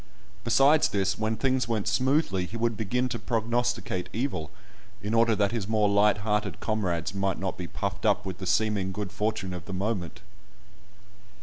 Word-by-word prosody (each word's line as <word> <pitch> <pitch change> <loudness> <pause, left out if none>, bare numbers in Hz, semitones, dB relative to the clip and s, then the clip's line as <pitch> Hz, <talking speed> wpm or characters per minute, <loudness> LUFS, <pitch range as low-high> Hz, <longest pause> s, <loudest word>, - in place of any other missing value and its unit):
Besides 135 +5 +5
this, 100 -1 0
when 110 0 0
things 130 -3 +1
went 110 -3 -1
smoothly 125 - +1
he 115 - -6
would 115 0 0
begin 125 +5 0
to 115 - -3
prognosticate 115 -5 -1
evil, 115 - -2 0.5
in 105 +2 -2
order 115 -1 +4
that 100 -1 +2
his 115 -5 -2
more 110 -1 +2
light 100 +1 +4
hearted 105 -4 0
comrades 95 -7 -1
might 100 -1 0
not 95 -1 -3
be 90 - -6
puffed 95 +2 -4
up 105 -2 +2
with 95 -1 -5
the 95 - -5
seeming 105 0 +1
good 100 0 -4
fortune 105 -3 -2
of 90 - -7
the 95 - -6
moment. 95 -3 -3
105 Hz, 175 wpm, -27 LUFS, 95-115 Hz, 0.5 s, Besides